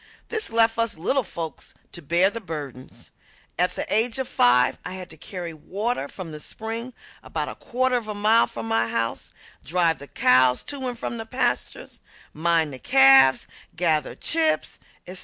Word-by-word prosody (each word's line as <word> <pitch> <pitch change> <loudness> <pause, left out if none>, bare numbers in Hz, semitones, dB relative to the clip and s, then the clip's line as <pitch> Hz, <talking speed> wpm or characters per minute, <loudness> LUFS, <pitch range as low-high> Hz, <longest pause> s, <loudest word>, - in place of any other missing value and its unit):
This 440 -2 +1
left 225 0 +3
us 230 -5 0
little 265 - +1
folks 165 - -7 0.2
to - - -9
bear 170 +6 +2
the 230 - -6
burdens. 145 - -8 0.5
At 180 +1 +2
the - - -2
age 225 +3 +2
of 265 -1 -2
five 125 +1 +3
I 180 - -6
had 185 -1 -8
to - - -10
carry 175 +1 -7
water 195 - -3
from 175 +1 -9
the 150 - -8
spring 225 +8 -5 0.3
about - - -4
a - - -6
quarter 255 +1 -1
of 230 -3 -6
a 210 - -4
mile 215 +3 +4
from 115 -1 -7
the 115 0 +1
house, 115 0 -3 0.3
drive 165 0 +1
the 140 - -9
cows 125 -1 +3
to 275 -3 -4
and 245 -1 -5
from 235 - -5
the 225 - -7
pastures, 250 - -2 0.3
mind 160 -2 +1
the 130 - -8
calves, 135 0 +6 0.3
gather 160 -4 0
chips, 320 -1 0 0.3
etc. 180 +1 -7
180 Hz, 175 wpm, -24 LUFS, 145-230 Hz, 0.5 s, calves